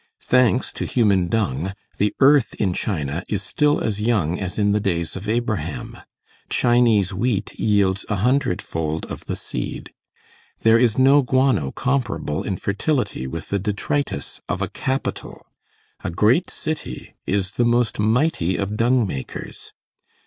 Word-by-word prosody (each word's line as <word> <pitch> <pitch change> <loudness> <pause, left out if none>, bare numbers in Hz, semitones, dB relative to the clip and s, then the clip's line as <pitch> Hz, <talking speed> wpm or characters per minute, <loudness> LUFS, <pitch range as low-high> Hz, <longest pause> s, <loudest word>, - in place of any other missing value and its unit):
Thanks 125 0 +3
to - - -3
human 100 -7 +2
dung, 95 -3 -1 0.3
the 105 +1 +1
earth 140 -2 +5
in 95 -4 0
China 80 -4 -2
is 105 -1 -1
still 150 +9 +2
as 105 -2 -1
young 100 -7 +1
as 95 -3 -4
in 105 -1 +2
the 105 - +2
days 85 -5 -1
of 100 +3 -5
Abraham. 115 -2 -2 0.5
Chinese 115 -6 +3
wheat 105 +1 -1
yields 100 -3 +2
a 105 - +1
hundred 125 0 +1
fold 80 -1 -3
of - - -7
the - - -3
seed. - - -5 0.7
There 115 +1 +5
is 115 -3 +3
no 135 +2 +6
guano 130 - +2
comparable 120 - -1
in 95 - -3
fertility 105 - -1
with 80 +4 -6
the 100 - 0
detritus 105 - -2
of - - -1
a - - -2
capital. 130 0 -4 0.6
A - - -2
great 110 - +2
city 155 - -5
is 95 -1 0
the 120 - 0
most 120 -2 +1
mighty 110 - +1
of 100 +1 -2
dung 120 +1 +3
makers. 70 -9 -6
105 Hz, 150 wpm, -22 LUFS, 95-125 Hz, 0.7 s, no